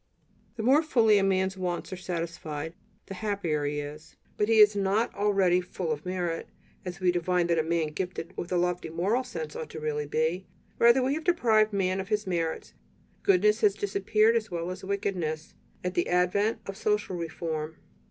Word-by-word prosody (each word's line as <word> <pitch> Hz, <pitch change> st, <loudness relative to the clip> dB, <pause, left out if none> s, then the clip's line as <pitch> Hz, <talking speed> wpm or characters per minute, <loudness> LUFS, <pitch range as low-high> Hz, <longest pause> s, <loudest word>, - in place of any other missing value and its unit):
The 225 Hz, -, -4 dB
more 270 Hz, +6 st, +5 dB
fully 225 Hz, -9 st, +4 dB
a -, -, +1 dB
man's 190 Hz, 0 st, +1 dB
wants 180 Hz, -1 st, -3 dB
are -, -, -3 dB
satisfied, 165 Hz, -3 st, -5 dB, 0.3 s
the -, -, -7 dB
happier 185 Hz, -7 st, -1 dB
he 145 Hz, 0 st, -1 dB
is; 150 Hz, +1 st, -9 dB, 0.2 s
but 210 Hz, -, +1 dB
he 225 Hz, -, +4 dB
is 210 Hz, -1 st, +7 dB
not 200 Hz, +3 st, +1 dB
already 195 Hz, -3 st, +2 dB
"full 180 Hz, -2 st, -4 dB
of 150 Hz, +3 st, -4 dB
merit," 175 Hz, -2 st, -2 dB, 0.4 s
as 180 Hz, -1 st, -6 dB
we 185 Hz, -1 st, +3 dB
divine 175 Hz, 0 st, +1 dB
that 170 Hz, -1 st, +2 dB
a -, -, +2 dB
man 165 Hz, -1 st, 0 dB
gifted 180 Hz, +2 st, -5 dB
with 175 Hz, -, -5 dB
a 180 Hz, -, +2 dB
lofty 175 Hz, -1 st, -1 dB
moral 195 Hz, +10 st, 0 dB
sense 160 Hz, -11 st, -6 dB
ought 155 Hz, -1 st, -6 dB
really 150 Hz, -1 st, -2 dB
to -, -, -13 dB
be. 165 Hz, +5 st, 0 dB, 0.3 s
Rather 235 Hz, +3 st, +6 dB
have -, -, +1 dB
we 280 Hz, +4 st, 0 dB
deprived 230 Hz, -11 st, +3 dB
man 190 Hz, -2 st, 0 dB
of 190 Hz, -, -4 dB
his 210 Hz, 0 st, 0 dB
merits; 170 Hz, -3 st, -2 dB, 0.5 s
"goodness" 210 Hz, +3 st, +3 dB
has 205 Hz, -2 st, +4 dB
disappeared 215 Hz, +2 st, +2 dB
as 215 Hz, -2 st, 0 dB
well 170 Hz, 0 st, -3 dB
as 185 Hz, +1 st, -8 dB
"wickedness" 185 Hz, -5 st, -3 dB, 0.3 s
at 180 Hz, 0 st, -2 dB
the 175 Hz, -, 0 dB
advent 200 Hz, +5 st, +1 dB
of 195 Hz, -, -6 dB
social 210 Hz, -3 st, 0 dB
reform. 160 Hz, -2 st, -4 dB
185 Hz, 190 wpm, -28 LUFS, 165-210 Hz, 0.5 s, is